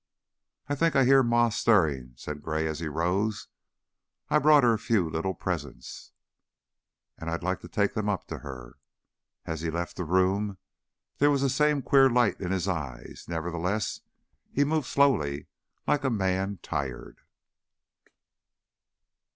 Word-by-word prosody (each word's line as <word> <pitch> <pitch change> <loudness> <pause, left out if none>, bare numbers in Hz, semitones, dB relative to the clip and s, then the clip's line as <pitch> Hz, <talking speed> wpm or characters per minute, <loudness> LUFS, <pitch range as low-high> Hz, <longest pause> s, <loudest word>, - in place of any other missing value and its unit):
"I 145 - -1
think 165 +3 +1
I 135 -2 +5
hear 135 +1 +6
Ma 120 -1 +3
stirring," 80 - +2
said 75 +4 -7
Gray, 80 0 -2
as 80 -1 -3
he 85 - -3
rose. 90 +7 -1 0.8
"I - - +4
brought 150 -1 +6
her 120 -1 +5
a 110 - -1
few 110 -6 +1
little 80 +4 -2
presents, 80 -7 -6 1.1
and 80 - -5
I'd 85 +1 -3
like 95 -1 -1
to - - -11
take 100 -1 0
them 105 -1 -1
up 100 -3 -2
to - - -5
her." 65 -4 -10 0.7
As 80 -1 -4
he 85 - -2
left 85 +1 -4
the 90 - -2
room 95 +4 +1 0.6
there 145 - +5
was 140 -2 +2
the 135 - +2
same 150 +1 +2
queer 135 0 +5
light 120 -2 +2
in 90 -1 -2
his 95 -1 -1
eyes; 70 -10 -5
nevertheless, 85 +5 -2 0.5
he 145 - +2
moved 150 -2 0
slowly, 75 - +2 0.4
like 145 -1 +1
a 135 - +2
man 95 -2 -1
tired. 70 -4 -5
95 Hz, 150 wpm, -27 LUFS, 80-120 Hz, 1.1 s, hear